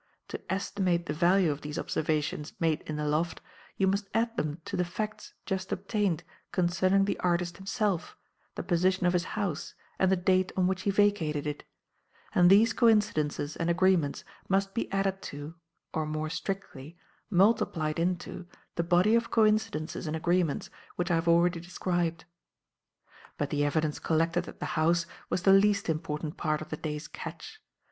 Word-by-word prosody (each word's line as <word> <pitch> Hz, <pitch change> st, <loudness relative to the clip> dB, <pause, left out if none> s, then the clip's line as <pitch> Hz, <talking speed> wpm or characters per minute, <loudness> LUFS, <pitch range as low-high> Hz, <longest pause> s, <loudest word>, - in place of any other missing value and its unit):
To -, -, -5 dB
estimate 185 Hz, -3 st, 0 dB
the -, -, -2 dB
value 175 Hz, +1 st, +3 dB
of 145 Hz, 0 st, -5 dB
these 150 Hz, +2 st, -5 dB
observations 150 Hz, -1 st, -1 dB
made 160 Hz, -2 st, +1 dB
in 155 Hz, -, -3 dB
the 150 Hz, 0 st, -2 dB
loft, 155 Hz, +3 st, 0 dB, 0.4 s
you 195 Hz, -, +3 dB
must 195 Hz, +1 st, 0 dB
add 230 Hz, +1 st, +1 dB
them 155 Hz, -4 st, -2 dB
to -, -, -4 dB
the 180 Hz, -, +1 dB
facts 210 Hz, +5 st, -5 dB
just 190 Hz, -1 st, -3 dB
obtained 195 Hz, -3 st, -1 dB, 0.3 s
concerning 185 Hz, +2 st, +2 dB
the 200 Hz, -, -2 dB
artist 175 Hz, -1 st, 0 dB
himself, 195 Hz, -2 st, -2 dB, 0.4 s
the -, -, -4 dB
position 185 Hz, +1 st, +2 dB
of 175 Hz, -, +3 dB
his 175 Hz, -1 st, +1 dB
house 195 Hz, -8 st, -3 dB, 0.2 s
and 190 Hz, 0 st, +3 dB
the -, -, +5 dB
date 185 Hz, +1 st, +2 dB
on 185 Hz, -, +3 dB
which 185 Hz, 0 st, 0 dB
he 200 Hz, -, 0 dB
vacated 195 Hz, -8 st, +2 dB
it; 150 Hz, -1 st, -4 dB, 0.7 s
and 175 Hz, -1 st, +6 dB
these 215 Hz, +4 st, +6 dB
coincidences 155 Hz, -10 st, +2 dB
and 165 Hz, 0 st, -1 dB
agreements 175 Hz, -4 st, +2 dB, 0.3 s
must 195 Hz, 0 st, +1 dB
be 230 Hz, -, -2 dB
added 195 Hz, -1 st, 0 dB
to 145 Hz, +2 st, -7 dB, 0.4 s
or, 155 Hz, -1 st, -1 dB
more 155 Hz, 0 st, -3 dB
strictly, 170 Hz, -4 st, -5 dB, 0.3 s
multiplied 175 Hz, -6 st, +2 dB
into 175 Hz, 0 st, -2 dB, 0.3 s
the 170 Hz, -, +2 dB
body 175 Hz, +5 st, +4 dB
of 230 Hz, 0 st, +2 dB
coincidences 215 Hz, -7 st, +1 dB
and 155 Hz, -, -2 dB
agreements 170 Hz, -1 st, 0 dB, 0.2 s
which 175 Hz, 0 st, -1 dB
I -, -, +4 dB
have 165 Hz, +1 st, -1 dB
already 170 Hz, +1 st, +4 dB
described. 175 Hz, -1 st, -2 dB, 1.1 s
"But -, -, -2 dB
the 145 Hz, 0 st, +1 dB
evidence 150 Hz, +1 st, 0 dB
collected 165 Hz, +2 st, +1 dB
at -, -, -10 dB
the -, -, -3 dB
house 170 Hz, +1 st, +2 dB, 0.2 s
was 180 Hz, -, -1 dB
the 195 Hz, -, +6 dB
least 200 Hz, -1 st, +4 dB
important 155 Hz, -1 st, -3 dB
part 155 Hz, -2 st, 0 dB
of 155 Hz, -, -8 dB
the 155 Hz, -, -4 dB
day's 150 Hz, 0 st, -4 dB
'catch.' 435 Hz, 0 st, -9 dB
175 Hz, 170 wpm, -29 LUFS, 155-195 Hz, 1.1 s, and